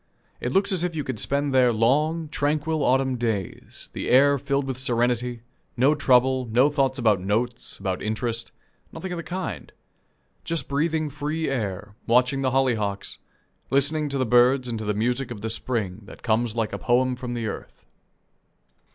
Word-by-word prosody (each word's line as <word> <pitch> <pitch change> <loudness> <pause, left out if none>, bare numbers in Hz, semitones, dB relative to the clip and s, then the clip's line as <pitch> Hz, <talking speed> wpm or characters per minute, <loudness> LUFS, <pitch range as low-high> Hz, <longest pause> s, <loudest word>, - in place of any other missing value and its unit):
It - - -2
looks 200 +2 +2
as 180 -3 +1
if 175 -2 -2
you 150 - -2
could 130 -6 -4
spend 140 +3 0
there 125 -2 +5
long, 150 +9 +1
tranquil 150 +1 0
autumn 130 -1 +2
days; 110 -6 -3
the - - -4
air 140 +2 +5
filled 140 0 -1
with 130 -2 -4
serenity; 120 -1 0 0.3
no 135 +5 +5
trouble, 130 -2 +3
no 125 +6 +3
thoughts 135 -2 +1
about 110 -7 +2
notes, 115 +5 -2
about 95 -2 -3
interest 115 +1 -2 0.4
nothing 190 - -6
of 175 - -3
the - - -3
kind; 185 +1 -5 0.7
just 165 -5 -2
breathing 155 +1 0
free 155 +3 -2
air, 105 -6 -3
watching 125 +3 +3
the 130 - +2
hollyhocks, 115 -7 0 0.5
listening 145 +2 +1
to 140 - -2
the 130 - +1
birds 125 +2 +4
and 115 -2 -3
to 110 - -5
the 105 0 0
music 125 +4 0
of 115 -4 -7
the 110 +1 -2
spring 110 -4 -2
that - - -13
comes 115 0 +1
like 115 -3 -1
a 100 - -3
poem 125 +6 +2
from 125 -1 -5
the 115 -1 -3
earth. 110 - -7
125 Hz, 175 wpm, -25 LUFS, 115-140 Hz, 0.7 s, there